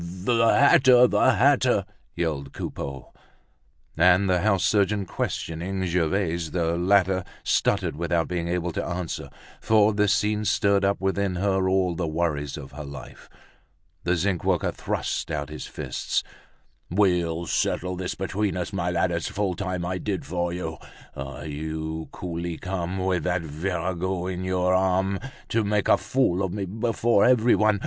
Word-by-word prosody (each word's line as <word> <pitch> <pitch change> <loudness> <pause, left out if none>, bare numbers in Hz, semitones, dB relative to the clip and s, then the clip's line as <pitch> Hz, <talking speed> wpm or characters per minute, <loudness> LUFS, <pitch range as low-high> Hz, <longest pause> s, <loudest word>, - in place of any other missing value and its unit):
"The 95 +7 +1
hatter! 130 -1 +6
The - - +3
hatter!" - - +3 0.3
yelled 75 -5 -2
Coupeau. 70 -2 -6 0.8
And 90 +4 +4
the 90 -1 +2
house 100 -2 +2
surgeon 100 -1 +2
questioning 90 +3 -3
Gervaise, 85 -1 0
the 85 0 0
latter 95 +1 +2 0.2
stuttered 95 -5 +1
without 85 0 0
being 85 -2 -2
able 90 0 -1
to - - -3
answer, 90 -1 -4 0.3
for 110 -1 +4
this 105 -1 +2
scene 105 +1 +1
stirred 100 -1 +2
up 100 +1 +1
within 95 0 0
her 95 0 +1
all 95 -2 +2
the 85 0 -2
worries 75 -3 -2
of 70 -3 -9
her 75 +2 -7
life. 70 -3 -10 0.7
The 90 +1 +1
zinc 90 0 -1
worker - - +1
thrust - - -3
out 75 -2 -3
his 75 0 -7
fists. - - -2 0.7
"We'll 85 -3 +1
settle 90 +2 -1
this 90 0 -4
between 95 +1 -2
us, 90 +1 -4
my 90 -3 -1
lad. 90 +1 +1
It's 85 0 -2
full 100 -2 -1
time 90 -2 -3
I 90 +1 -2
did 100 -3 -3
for 85 +2 -2
you! 80 -3 -4 0.4
Ah, 70 +2 -7
you 80 +1 -5
coolly 85 -1 -5
come, 90 -1 -3
with 95 -2 0
that 90 -1 0
virago 90 +3 -2
on 90 +1 -5
your 90 0 +1
arm, 95 +1 +1 0.3
to 115 0 +1
make 105 0 0
a - - +6
fool 100 -1 0
of 95 -2 -1
me 100 0 -3
before 115 +1 +1
everyone. 115 -3 +4
Well! - - -5
90 Hz, 155 wpm, -25 LUFS, 85-100 Hz, 0.8 s, hatter